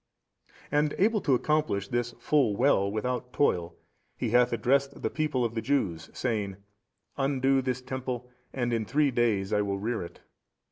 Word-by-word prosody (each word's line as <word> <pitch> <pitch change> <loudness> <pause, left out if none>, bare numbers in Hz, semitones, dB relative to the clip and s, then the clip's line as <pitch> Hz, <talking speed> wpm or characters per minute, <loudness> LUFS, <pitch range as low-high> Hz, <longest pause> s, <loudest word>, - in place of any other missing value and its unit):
And 150 0 +2
able 210 +2 +3
to 135 - +3
accomplish 135 -8 0
this 120 0 -1
full 135 -9 +2
well 100 -5 +3
without 125 +3 -2
toil, 90 -13 +1 0.4
He - - -2
hath 120 0 +4
addressed 135 +4 +1
the - - 0
people 150 -6 0
of 115 - -2
the 115 - -2
Jews 100 - -1
saying, 105 -6 -2 0.6
Undo 135 -1 +2
this 130 -1 -2
Temple 130 -1 -4 0.2
and 120 -2 -1
in 115 -1 +1
three 145 +6 +2
days 110 -5 +1
I 105 - +3
will 100 -1 -1
rear 110 +2 -2
it. 85 - -9
125 Hz, 160 wpm, -28 LUFS, 110-135 Hz, 0.6 s, hath